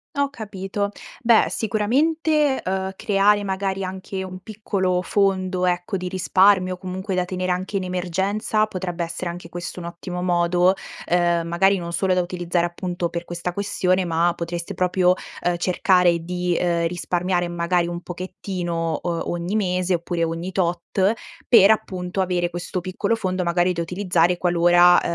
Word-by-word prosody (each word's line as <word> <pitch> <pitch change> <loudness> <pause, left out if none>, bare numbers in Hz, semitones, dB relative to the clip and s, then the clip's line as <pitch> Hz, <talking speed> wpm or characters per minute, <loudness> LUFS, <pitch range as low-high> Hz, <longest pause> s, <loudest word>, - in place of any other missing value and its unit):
Ho 280 0 +1
capito. 200 -4 -4 0.3
Beh, 230 -2 +5
sicuramente, 285 +7 +1
uhm, 190 0 -2
creare 205 -1 +3
magari 195 0 -2
anche 190 +1 -5
un 185 0 -7
piccolo 190 -3 -1
fondo 185 -1 +1
ecco, 180 +1 0
di 185 0 -4
risparmio 185 0 +3
comunque 190 +1 -4
da 180 -1 +1
tenere 185 0 -2
anche 185 +3 -2
in 190 - -2
emergenza, 190 +4 0
potrebbe 180 -3 -4
essere 170 +1 -4
anche 170 -1 -9
questo 175 +1 -6
un 170 - -6
ottimo 180 +1 -6
modo, 175 +1 +3 0.3
uhm, 175 -1 +2
magari 190 +3 +3
non 170 -1 -6
solo 185 +2 +1
da 180 - +2
utilizzare 175 -1 -1
appunto 175 0 -3
per 170 0 -5
questa 175 +1 -4
questione, 185 -1 0
ma 170 +1 +2
potreste 170 +3 -5
proprio, 180 0 +3 0.3
uhm, 175 0 +2
cercare 180 -1 +3
di, 180 +1 -2
uhm, 170 -1 +1
risparmiare 175 +1 -1
magari 175 0 0
un 175 0 -5
pochettino, 175 -2 -4
uhm, 170 -1 -2
ogni 175 +4 -3
mese, 185 -3 +1
oppure 170 0 -2
ogni 165 +3 -3
tot, 185 +2 +1 0.4
per 215 -4 +8
appunto 185 -3 -1
avere 175 -2 0
questo 175 +1 -4
piccolo 195 +5 -1
fondo 185 -4 -2
magari 175 +1 +2
da 170 - -2
utilizzare 180 0 +1
qualora, 175 0 +5
180 Hz, 155 wpm, -22 LUFS, 175-190 Hz, 0.4 s, per